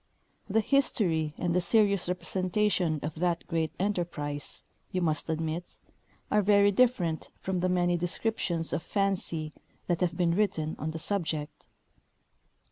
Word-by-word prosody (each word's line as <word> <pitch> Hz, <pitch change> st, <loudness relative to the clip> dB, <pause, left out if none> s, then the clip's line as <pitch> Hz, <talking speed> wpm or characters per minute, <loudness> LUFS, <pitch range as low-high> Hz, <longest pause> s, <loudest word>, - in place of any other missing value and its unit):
The 220 Hz, +3 st, +3 dB
history 175 Hz, -, +1 dB
and 175 Hz, -1 st, 0 dB
the 180 Hz, -, +3 dB
serious 200 Hz, 0 st, +3 dB
representation 185 Hz, -2 st, 0 dB
of 150 Hz, +1 st, -3 dB
that 175 Hz, -1 st, 0 dB
great 165 Hz, -2 st, -1 dB
enterprise, 170 Hz, -7 st, -3 dB, 0.3 s
you 185 Hz, -, 0 dB
must 160 Hz, -3 st, -1 dB
admit, 160 Hz, +2 st, -3 dB, 0.5 s
are 210 Hz, -, +4 dB
very 205 Hz, 0 st, +5 dB
different 190 Hz, -8 st, +2 dB
from 190 Hz, -1 st, -2 dB
the 185 Hz, +1 st, +1 dB
many 175 Hz, -1 st, +2 dB
descriptions 175 Hz, -1 st, -1 dB
of -, -, 0 dB
fancy 175 Hz, -6 st, -1 dB, 0.3 s
that 175 Hz, -1 st, 0 dB
have 175 Hz, -1 st, 0 dB
been 175 Hz, -2 st, +2 dB
written 175 Hz, -6 st, 0 dB
on 155 Hz, -, -2 dB
the 160 Hz, -, -4 dB
subject. 160 Hz, -4 st, -3 dB
175 Hz, 135 wpm, -29 LUFS, 160-200 Hz, 0.5 s, very